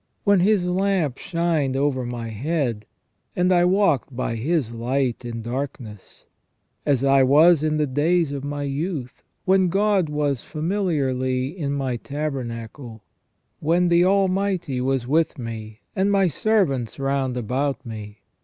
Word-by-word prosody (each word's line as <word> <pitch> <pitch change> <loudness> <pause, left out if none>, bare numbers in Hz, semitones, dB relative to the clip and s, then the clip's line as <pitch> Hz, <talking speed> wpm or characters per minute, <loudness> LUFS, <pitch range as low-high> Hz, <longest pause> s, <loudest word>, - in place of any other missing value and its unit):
When 200 -2 +4
His 195 0 +3
lamp 180 -6 0
shined 165 -6 0
over 135 -2 0
my 120 -1 -5
head, 120 -2 -2 0.5
and 180 +1 +2
I 175 -1 +4
walked 180 -8 +2
by 120 -2 -2
His 130 0 -1
light 125 +2 -1
in 115 -1 -5
darkness. 120 -4 -6 0.6
As 140 -3 +2
I 135 0 +5
was 150 +5 +6
in 155 0 0
the 150 - +2
days 155 +4 +1
of 140 -1 -4
my 145 0 -3
youth, 140 -2 -4 0.2
when 190 -1 +4
God 195 -2 +2
was 145 -4 -1
familiarly 145 -6 -1
in 145 -6 -2
my 135 -3 -2
tabernacle. 120 -5 -5 0.6
When 175 +3 +2
the 170 0 +5
Almighty 190 -6 +1
was 130 -1 0
with 155 +5 +1
me, 110 -3 -7
and 195 +2 +2
my 195 -2 +3
servants 150 - 0
round 135 -2 -1
about 130 +5 -2
me. 105 -3 -8
140 Hz, 140 wpm, -23 LUFS, 125-175 Hz, 0.6 s, was